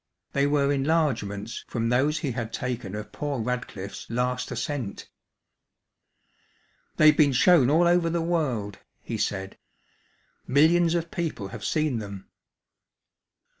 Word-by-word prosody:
They 140 0 +2
were 145 -1 +2
enlargements 130 -8 -1
from 115 -1 -1
those 140 +6 +2
he 145 -5 -2
had 115 -2 -4
taken 120 -6 -4
of 105 0 -7
poor 145 -3 -3
Radcliffe's 110 -5 -5
last 125 +2 -1
ascent. 135 -10 -4 1.9
"They've 155 0 +7
been 145 -3 +4
shown 135 0 +5
all 165 +4 +4
over 175 -1 +3
the 170 +1 0
world," 135 - -1 0.2
he 115 -2 -4
said. 95 -2 -3 0.9
"Millions 165 +5 +4
of 170 -1 -2
people 155 -13 -3
have - - -8
seen 155 -6 0
them." 100 -2 -8
130 Hz, 125 wpm, -26 LUFS, 115-155 Hz, 1.9 s, They've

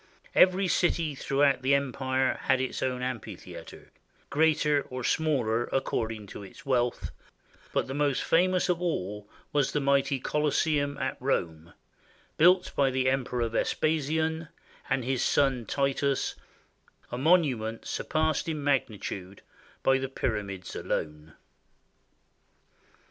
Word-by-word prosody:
Every 185 +1 +5
city 170 -3 +1
throughout 140 0 +2
the 135 +2 +3
empire 130 -1 0
had 130 -1 +3
its 130 0 -3
own 125 -1 -1
amphitheater, 125 -4 -7 0.4
greater 150 -1 +3
or 130 0 -5
smaller 120 -7 +1
according 110 -5 -2
to - - -8
its 100 - -12
wealth, 125 -3 0 0.6
but - - 0
the 135 - -6
most 145 -1 +1
fa 175 +3 +4
mous 185 -1 +1
of 180 -1 0
all 105 - -3 0.2
was 145 -2 +1
the 150 - +1
mighty 140 -1 +2
Colosseum 145 0 0
at - - -2
Rome, 85 - -2 0.6
built 180 +3 +4
by 140 -1 +3
the 130 0 +1
Emperor 125 -3 -1
Vespasian 160 +6 0 0.4
and 130 - 0
his 130 -1 0
son 135 -5 +2
Titus, 140 0 0 0.8
a 120 - -3
monument 130 -9 +2
surpassed 155 +1 -1
in 155 -2 -3
magnitude 105 -8 -2 0.4
by 135 0 +4
the 135 0 -3
Pyramids 100 -8 -3
alone. 75 0 -4
135 Hz, 120 wpm, -28 LUFS, 120-150 Hz, 0.8 s, Every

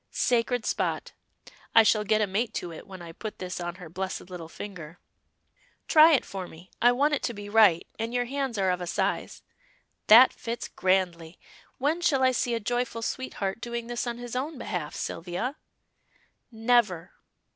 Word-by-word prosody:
Sacred 245 -1 0
spot; - - -2 0.6
I 225 - +9
shall 215 -1 +3
get 215 +1 +2
a - - +3
mate 215 +4 -2
to 175 - -4
it 160 - -11
when 190 -2 -10
I 165 - -9
put 215 +5 -7
this 180 -1 -5
on 175 0 -4
her 180 -2 -10
blessed 185 +2 -5
little 170 -3 -7
finger. 170 -4 -9 0.9
Try 315 +1 +7
it 270 - +2
for 190 -2 -6
me, 175 +3 -15
I 245 - +6
want 285 +5 +2
it 290 - 0
to 240 - -3
be 205 0 -8
right, 205 -6 +5
and 225 +1 -2
your 245 0 0
hands 270 -2 -3
are 190 -2 +2
of 180 0 -2
a 175 - -4
size. - - -2 0.6
That 235 +4 +9
fits 235 0 -5
grandly. 180 -3 0 0.4
When 300 +6 0
shall 275 -6 +2
I 260 - +5
see 245 -1 0
a - - -1
joyful 235 +1 -2
sweetheart 220 -5 -3
doing 235 -1 -4
this 240 +1 -3
on 235 0 -3
his 245 0 -7
own 285 +4 -3
behalf, 180 -10 -4
Sylvia?" 180 - -4 0.9
"Never!" 220 -7 +1
220 Hz, 180 wpm, -27 LUFS, 180-245 Hz, 0.9 s, I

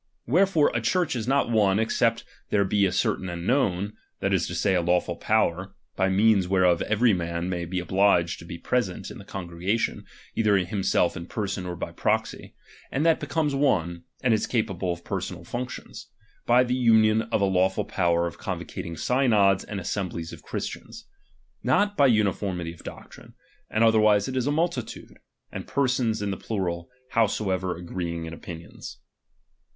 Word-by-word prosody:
Wherefore 170 +2 +3
a 120 - 0
Church 170 +6 +1
is 115 -1 -3
not 135 -2 +2
one, 100 -4 +3
except 115 +1 +1 0.3
there 100 -1 +2
be 100 0 +2
a - - -2
certain 95 0 0
and 85 0 -5
known, 105 -6 +1 0.3
that - - 0
is - - +1
to - - -5
say, 100 - +1
a 90 - +2
lawful 85 0 +1
power, 95 -2 0 0.2
by 95 - +2
means 100 -1 +3
whereof 90 -2 +3
every 110 +1 +3
man 85 0 -2
may 85 -2 -2
be 90 +2 -3
obliged 90 -1 +2
to 85 - -11
be 85 - -7
present 110 -3 -2
in - - -9
the - - -10
congregation, 90 +4 -3 0.3
either 105 -3 +3
himself 95 -1 +1
in 85 -1 -7
person, 100 -3 -3
or 90 - -4
by - - -5
proxy; - - -2 0.4
and 140 +4 0
that 165 -1 +4
becomes 155 -3 -1
one, 90 - +1 0.2
and 125 -3 +4
is 110 - 0
capable 95 -6 -1
of 85 0 -6
personal 95 -2 -4
functions, 120 +7 -6 0.4
by 125 +1 +5
the 125 0 -1
union 110 -3 +4
of 115 0 -1
a 100 - +3
lawful 95 0 +1
power 85 -2 +1
of 85 - -6
convocating 85 -1 -5
synods 110 - +3
and 100 - -5
assemblies 90 -3 -4
of - - -10
Christians; - - -6 0.6
not 205 0 +2
by 140 -7 +5
uuiformity 100 -6 0
of 85 - -15
doc - - -10
trine; - - -14 0.4
and 110 - +2
otherwise 110 -2 +4
it 130 - -4
is 130 0 0
a - - +2
multitude, 160 -5 -3 0.3
and - - -7
persons 125 -5 0
in 100 - -1
the 95 - -3
plural, 85 -5 -3 0.2
howsoever 95 -5 0
agreeing 85 -1 -4
in 80 - -7
opinions. 85 0 -9
100 Hz, 175 wpm, -26 LUFS, 90-115 Hz, 0.6 s, by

